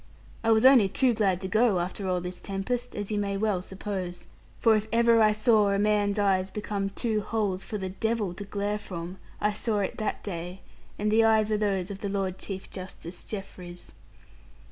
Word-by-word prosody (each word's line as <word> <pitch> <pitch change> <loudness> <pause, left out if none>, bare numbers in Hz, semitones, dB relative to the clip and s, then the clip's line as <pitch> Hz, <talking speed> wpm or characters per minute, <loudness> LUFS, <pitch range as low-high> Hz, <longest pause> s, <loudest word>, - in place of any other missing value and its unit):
I 225 - +1
was 220 +1 +5
only 255 -7 +7
too 255 +4 +3
glad 195 -5 +1
to 190 - -3
go, 215 -2 +3
after 190 +3 -3
all 180 -1 0
this 180 0 -6
tempest; 235 +6 -3
as 205 0 -4
you 210 - 0
may 200 -1 -1
well 205 -3 0
suppose. 185 -2 -5 0.3
For 225 -2 +5
if 215 0 -1
ever 230 0 +5
I 215 -1 +6
saw 215 -1 +3
a 200 - +2
man's 205 0 +2
eyes 195 -2 +2
become 205 -1 -3
two 215 +1 -1
holes 205 -3 -1
for 215 - -4
the 190 -2 -4
devil 215 -1 -1
to 200 - -7
glare 205 +1 -2
from, 180 -1 -7 0.2
I 210 0 +1
saw 215 0 -1
it 195 - -3
that 215 - -2
day; 180 -1 -6 0.4
and 210 +1 0
the 225 +1 +5
eyes 220 -1 +3
were 215 - +2
those 200 -2 0
of 195 - -7
the 200 - -3
Lord 190 -2 -2
Chief 190 -2 -5
Justice 185 -2 -8
Jeffreys. 180 -4 -8
205 Hz, 200 wpm, -27 LUFS, 190-215 Hz, 0.4 s, only